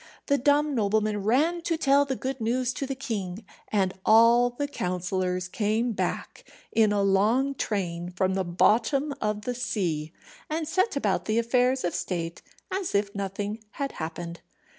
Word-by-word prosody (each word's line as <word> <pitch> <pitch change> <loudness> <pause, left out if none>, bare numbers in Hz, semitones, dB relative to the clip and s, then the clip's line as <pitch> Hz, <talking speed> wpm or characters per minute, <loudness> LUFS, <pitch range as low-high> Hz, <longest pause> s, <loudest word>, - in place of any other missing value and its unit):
The 280 -1 +2
dumb 290 +3 +3
nobleman 210 -2 +1
ran 305 - +2
to 330 -1 -1
tell 280 -1 +4
the 270 -1 -2
good 265 0 -4
news 245 +2 0
to 275 - -4
the 270 - -3
king, 215 -7 -4 0.2
and 190 -3 +1
all 230 +2 +6
the 285 +4 -3
counsellors 180 -5 -2
came 220 +5 0
back 215 - -3 0.3
in 220 -2 +4
a 205 -1 +2
long 215 +8 +3
train 175 -8 -2
from 185 +1 0
the 190 0 0
bottom 230 - +2
of 210 0 -1
the 250 - -2
sea, 175 -11 -2 0.4
and 315 0 -2
set 375 +3 +1
about 210 -9 0
the 215 +1 0
affairs 250 +2 +2
of 175 - -1
state 170 -1 -3 0.3
as 375 - -2
if 200 0 +1
nothing 200 +2 -4
had 280 -1 -3
happened. 170 +1 -6
220 Hz, 160 wpm, -27 LUFS, 190-265 Hz, 0.4 s, all